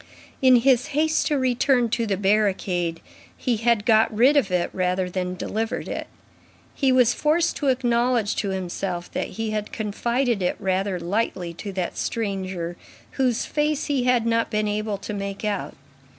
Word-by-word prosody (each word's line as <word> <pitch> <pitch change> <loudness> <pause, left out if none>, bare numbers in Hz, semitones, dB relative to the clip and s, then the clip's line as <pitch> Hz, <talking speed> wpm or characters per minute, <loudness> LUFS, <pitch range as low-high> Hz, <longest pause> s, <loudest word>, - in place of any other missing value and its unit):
In 260 -1 +7
his 250 0 +3
haste 315 +1 +2
to 295 - +1
return 255 -1 +2
to 230 0 -1
the 195 -2 0
barricade, 190 -4 +1 0.4
he 240 -3 0
had 225 -1 +1
got 220 -1 +4
rid 245 +7 +4
of 275 -9 +3
it 180 -1 0
rather 180 0 0
than 180 0 -2
delivered 220 +4 -3
it. - - -4 0.7
He 270 -2 +2
was 250 -2 +4
forced 325 +5 +1
to 290 - -2
acknowledge 240 -3 +1
to 200 - -1
himself 185 -1 -4
that - - -2
he 225 -1 -2
had 215 -1 -3
confided 235 +2 -1
it 180 - 0
rather 190 0 -1
lightly 175 -1 -2
to 200 +4 -7
that 185 -2 -3
stranger 190 -5 -3 0.3
whose 255 -4 0
face 300 -1 0
he 270 -4 0
had 250 -2 +3
not 230 0 +1
been 215 -1 0
able 210 0 -2
to 200 - -6
make 200 +1 -4
out. 205 -2 -2
215 Hz, 165 wpm, -24 LUFS, 190-245 Hz, 0.7 s, In